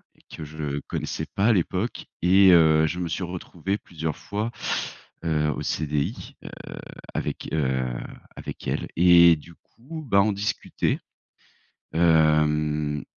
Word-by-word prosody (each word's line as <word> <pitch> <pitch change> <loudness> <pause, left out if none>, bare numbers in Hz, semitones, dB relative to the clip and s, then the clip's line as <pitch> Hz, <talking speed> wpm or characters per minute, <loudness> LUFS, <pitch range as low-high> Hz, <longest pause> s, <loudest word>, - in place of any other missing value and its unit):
et - - -26
que 80 - -7
je 75 -1 -4
connaissais - - -3
pas 100 - +2
à 120 - +6
l'époque 95 +4 -1 0.2
et, 95 +2 +6
heu, 80 -2 +6
je 90 +3 -4
me 90 - -2
suis 85 +3 -3
retrouvé 90 +2 -4
plusieurs 80 -5 -5
fois, 105 +3 -4 0.7
heu, 75 -2 +1
au - - -4
CDI, 75 -2 -2
heu, - - -6 0.6
avec, - - -4
heu, 65 -4 0 0.5
avec - - -8
elle. - - -2
Et 85 -1 +7
du 85 +2 -13
coup, 155 +6 -11
bah, 100 - +5
on 105 +1 +2
discutait, 100 +1 -1 0.9
hem, 75 -2 +2
80 Hz, 135 wpm, -25 LUFS, 75-95 Hz, 0.9 s, Et